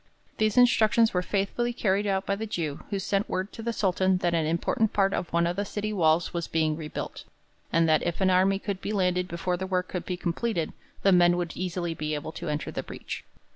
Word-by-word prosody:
These 215 0 +2
instructions 230 -2 +5
were 180 - +2
faithfully 205 +6 -1
carried 205 -2 +1
out 195 0 0
by 200 - 0
the 220 +2 -4
Jew, 160 -8 -3
who 200 - -1
sent 195 +1 -1
word 190 +2 -2
to - - -7
the 235 +1 -1
Sultan 190 -3 +2
that 175 -1 0
an 160 -2 +1
important 170 +6 +1
part 195 -1 +2
of 175 - -3
one 170 0 +2
of 175 +1 0
the 200 - -1
city 210 +1 -3
walls 165 -2 +2
was 170 -1 -2
being 155 -1 +1
rebuilt, 155 -2 -6 0.5
and 165 0 +3
that 155 -1 +4
if 175 -1 -2
an 190 -1 +3
army 190 +2 +4
could 200 -1 -4
be 210 - -3
landed 180 -2 +1
before 180 +1 -2
the 190 +1 -4
work 185 -1 -1
could 180 - -4
be 180 - -2
completed, 175 0 -2 0.3
the 195 - +5
men 175 -1 +5
would 175 -2 -3
easily 175 -2 -2
be 155 -1 -3
able 150 +1 -5
to 170 0 -6
enter 150 0 -2
the - - -3
breach. - - -7
185 Hz, 230 wpm, -27 LUFS, 170-200 Hz, 0.5 s, instructions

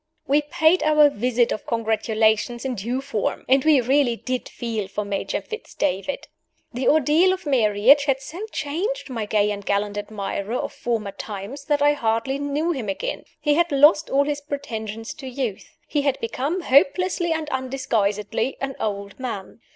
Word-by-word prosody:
We 290 +2 +3
paid 320 +3 +3
our 300 -1 +5
visit 240 0 +1
of - - -4
congratulation 220 +1 +1
in 265 -1 -2
due 240 +5 -3
form; 275 -7 -2
and 265 +1 +4
we 305 -3 +5
really 260 0 +2
did 255 +2 -4
feel 225 -4 -4
for 205 +2 -4
Major 200 -1 -2
Fitz 440 +1 -9
David. 195 +10 -2 0.5
The 250 +2 -2
ordeal 315 +5 +4
of 375 -2 -6
marriage 255 +1 +4
had 270 -2 +1
so 305 +6 -9
changed 335 - -3
my 225 -4 -3
gay 210 0 +2
and 200 0 -5
gallant 205 +1 -1
admirer 205 +1 -4
of - - -3
former 225 -4 -2
times 205 +7 -7
that 290 -1 +1
I 290 0 +5
hardly 230 +1 -1
knew 290 +4 -1
him 255 -10 -3
again. 195 - -3
He 295 -1 +2
had 340 +2 +2
lost 295 +3 +5
all 275 +1 +3
his 290 0 -2
pretensions 225 -7 -5
to 270 - -9
youth: 250 -5 -5
he 295 - 0
had 280 -2 0
become, 280 +10 -2
hopelessly 345 +5 +3
and 320 -1 -1
undisguisedly, 230 -3 -1
an 270 -1 -3
old 200 0 -4
man. 225 -5 -6
260 Hz, 170 wpm, -23 LUFS, 220-290 Hz, 0.5 s, our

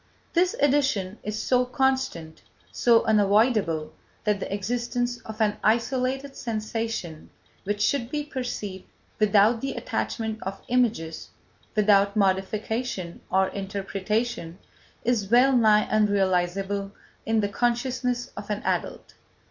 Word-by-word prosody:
This 360 +5 +2
addition 265 -9 +1
is 210 +1 -4
so 250 +2 +2
constant, 250 - -1 0.3
so 235 -2 +4
unavoidable, 205 -7 +2 0.3
that 210 -2 +1
the - - -5
existence 240 +4 -2
of 220 0 -9
an 210 -2 +2
isolated 255 +4 0
sensation 220 -7 -4 0.4
which 205 +1 -1
should 245 -2 +1
be 295 +1 -2
perceived 245 -9 -5 0.3
without 215 +2 +4
the 275 - -2
attachment 220 -2 -3
of 195 0 -5
images, 225 -10 0 0.5
without 200 -1 +4
modification 195 0 -1
or 190 0 +2
interpretation, 195 -1 -3 0.5
is 220 -5 0
well 255 +3 +5
nigh 215 -3 +5
unrealisable 195 -1 +1 0.4
in 225 0 +2
the 205 - -1
consciousness 245 +2 -1
of 205 - -8
an 210 -1 -2
adult. - - -2
215 Hz, 115 wpm, -26 LUFS, 195-245 Hz, 0.5 s, well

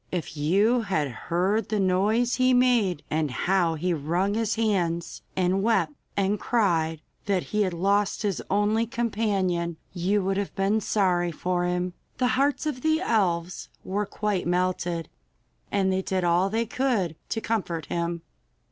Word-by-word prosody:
If 175 -3 -4
you 200 +11 +3
had 185 -9 0
heard 180 - -1
the 215 -1 0
noise 205 +6 +2
he 255 0 +4
made, 235 - +3
and 155 -1 +1
how 175 +4 +1
he 175 +3 0
wrung 170 +6 0
his 220 -1 0
hands 180 -7 -1
and 185 +1 +1
wept 195 -8 +2 0.2
and 200 +1 +1
cried 165 -9 +1 0.3
that 195 -3 +1
he 210 - +2
had 185 -3 +1
lost 200 +4 +1
his 200 -4 -1
only 210 +3 +2
companion, 200 -8 -1 0.2
you 190 +3 +1
would 195 +1 0
have 200 -1 -3
been 200 +3 +1
sorry 180 -4 +1
for 175 +2 -1
him. 180 0 -1 0.2
The 250 -1 +2
hearts 280 +4 +1
of 285 -5 -2
the 315 +2 +2
elves 185 - 0
were 200 +2 -2
quite 205 -4 -2
melted, 175 -2 0 0.6
and 190 -2 +2
they 190 - +1
did 190 -1 -1
all 175 +2 +3
they 225 +3 0
could 225 - 0
to 225 - -1
comfort 185 -9 -2
him. 170 -1 -3
190 Hz, 155 wpm, -26 LUFS, 175-215 Hz, 0.6 s, he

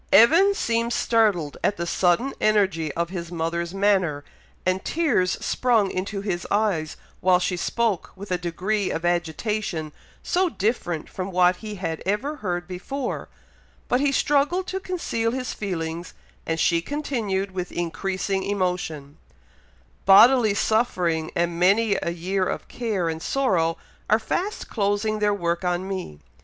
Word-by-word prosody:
Evan 335 - +6
seemed 230 - 0
startled 210 -12 +1
at 205 - +1
the 170 - -2
sudden 180 +10 +1
energy 190 -8 +2
of 170 0 -1
his 170 -2 -5
mother's 170 0 -2
manner, 190 -7 +1 0.4
and 185 +1 +1
tears 290 - +1
sprung 230 -6 +2
into 195 +2 -3
his 190 -4 -3
eyes 195 -7 0 0.2
while 185 0 +4
she 180 0 -1
spoke 215 +2 -1
with 195 0 -9
a 180 - +2
degree 185 +4 -1
of 165 - -3
agitation 175 -1 -1 0.3
so 365 0 +1
different 195 - -2
from 185 0 -5
what 180 -1 +3
he 215 -1 -7
had 165 -4 -4
ever 240 +10 -1
heard 175 -5 -3
before; 245 +9 -4 0.6
but 250 - +2
he 285 0 +2
struggled 295 +7 +2
to 380 - -3
conceal 285 -12 -2
his 255 -1 -3
feelings, 170 -3 -4 0.3
and 165 0 -1
she 170 +2 +3
continued 215 - -2
with 180 -1 -4
increasing 190 +3 -2
emotion, 180 -7 -2 0.9
"Bodily 220 +2 +7
suffering, 180 -9 +1
and 170 0 0
many 200 +3 +4
a - - -1
year 185 +3 -1
of - - -4
care 215 -8 -2
and 160 0 -3
sorrow, 175 -12 +1 0.3
are 215 - +5
fast 360 - -3
closing 210 0 0
their 210 0 +2
work 175 -3 -1
on 180 +1 -1
me. 185 - -5
195 Hz, 145 wpm, -24 LUFS, 175-225 Hz, 0.9 s, Bodily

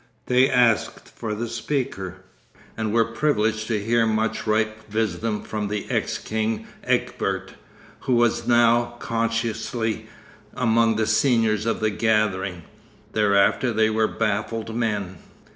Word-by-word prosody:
They 125 +1 +4
asked 120 -3 +2
for 105 -2 -5
the 120 +3 -3
speaker, 110 - -3 0.5
and 110 -1 -2
were 115 0 +3
privileged 110 -4 0
to 110 -3 0
hear 115 +2 +2
much 110 +1 -1
ripe 110 0 -1
wisdom 110 0 -1
from 105 -1 -3
the 105 0 -3
ex - - 0
king 110 0 -2 0.2
Egbert, - - -1 0.5
who 130 - 0
was 120 -1 +2
now 120 0 +3
consciously 115 -1 -2 0.5
among 115 -1 +3
the 110 0 +1
seniors 110 -2 +2
of 115 - -1
the 110 0 +2
gathering. 100 -5 0 0.5
Thereafter 105 +4 +3
they 110 0 +2
were 110 0 +2
baffled 110 +1 -2
men.... 105 -6 -2
110 Hz, 125 wpm, -23 LUFS, 105-115 Hz, 0.5 s, They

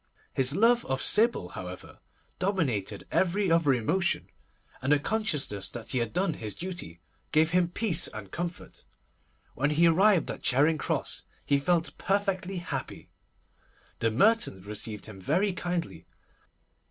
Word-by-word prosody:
His 135 +2 +4
love 235 +4 +4
of 135 0 -1
Sybil, 215 - +2
however, 90 0 -9 0.4
dominated 135 - -1
every 190 0 +1
other 165 -4 +4
emotion, 155 +9 0 0.5
and 130 +3 0
the 150 - +6
consciousness 145 - -1
that 115 -2 -5
he 130 - +2
had 115 -2 -2
done 180 - 0
his 110 -8 -5
duty 175 - -5 0.3
gave 155 +1 +3
him 180 -1 +3
peace 180 -3 +1
and 100 -3 -9
comfort. 175 0 -6 0.7
When 145 +4 0
he 155 +3 +3
arrived 185 +2 +4
at - - -8
Charing 150 +5 +3
Cross, - - -2 0.2
he 140 -1 +2
felt 170 +2 0
perfectly 195 -1 -1
happy. 135 - -6 0.9
The 115 - +2
Mertons 130 - +2
received 105 0 -3
him 100 -3 -11
very 195 - +1
kindly. 175 0 -4
160 Hz, 140 wpm, -28 LUFS, 115-185 Hz, 0.9 s, the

